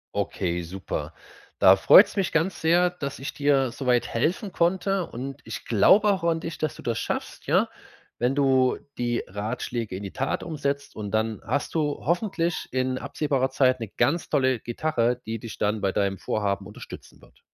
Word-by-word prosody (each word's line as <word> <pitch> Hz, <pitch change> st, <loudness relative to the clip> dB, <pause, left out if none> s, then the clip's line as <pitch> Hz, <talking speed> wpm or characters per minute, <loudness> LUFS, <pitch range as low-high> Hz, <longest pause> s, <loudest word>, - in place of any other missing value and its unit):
Okay, 90 Hz, -3 st, -2 dB
super. 90 Hz, +3 st, -5 dB, 0.5 s
Da -, -, +8 dB
freut's -, -, +7 dB
mich 195 Hz, -3 st, 0 dB
ganz 165 Hz, +4 st, 0 dB
sehr, 175 Hz, +2 st, +4 dB
dass 145 Hz, -7 st, -6 dB
ich 135 Hz, -, -5 dB
dir 140 Hz, -4 st, +2 dB
so 135 Hz, -, -7 dB
weit 125 Hz, -1 st, +2 dB
helfen 175 Hz, -, -1 dB
konnte. 180 Hz, +2 st, +1 dB
Und 135 Hz, +3 st, -7 dB
ich -, -, -7 dB
glaube 195 Hz, -, +5 dB
auch 190 Hz, -3 st, -1 dB
an 165 Hz, -1 st, +1 dB
dich, 165 Hz, -1 st, -6 dB
dass 155 Hz, -3 st, -2 dB
du -, -, -11 dB
das 115 Hz, -2 st, -2 dB
schaffst, -, -, -4 dB
ja? -, -, +3 dB, 0.5 s
Wenn 125 Hz, +3 st, +1 dB
du 130 Hz, -2 st, +3 dB, 0.2 s
die 120 Hz, -1 st, -1 dB
Ratschläge 110 Hz, +1 st, -4 dB
in 95 Hz, -, -6 dB
die 100 Hz, -, -6 dB
Tat 135 Hz, -, -2 dB
umsetzt 140 Hz, -3 st, -3 dB
und 105 Hz, -2 st, -5 dB
dann 110 Hz, 0 st, -1 dB
hast 140 Hz, +5 st, -2 dB
du 150 Hz, -2 st, 0 dB
hoffentlich 175 Hz, 0 st, -1 dB
in 130 Hz, 0 st, 0 dB
absehbarer 135 Hz, -3 st, -1 dB
Zeit 130 Hz, -1 st, +3 dB
'ne 115 Hz, -, -4 dB
ganz 170 Hz, -, +1 dB
tolle 130 Hz, -5 st, +2 dB
Gitarre, 120 Hz, -1 st, -1 dB
die 115 Hz, 0 st, -3 dB
dich 115 Hz, 0 st, -8 dB
dann 105 Hz, +1 st, 0 dB
bei 100 Hz, -1 st, 0 dB
deinem 100 Hz, -1 st, 0 dB
Vorhaben 100 Hz, -2 st, -2 dB
unterstützen 105 Hz, -, -11 dB
wird. -, -, -21 dB
130 Hz, 180 wpm, -25 LUFS, 110-160 Hz, 0.5 s, Da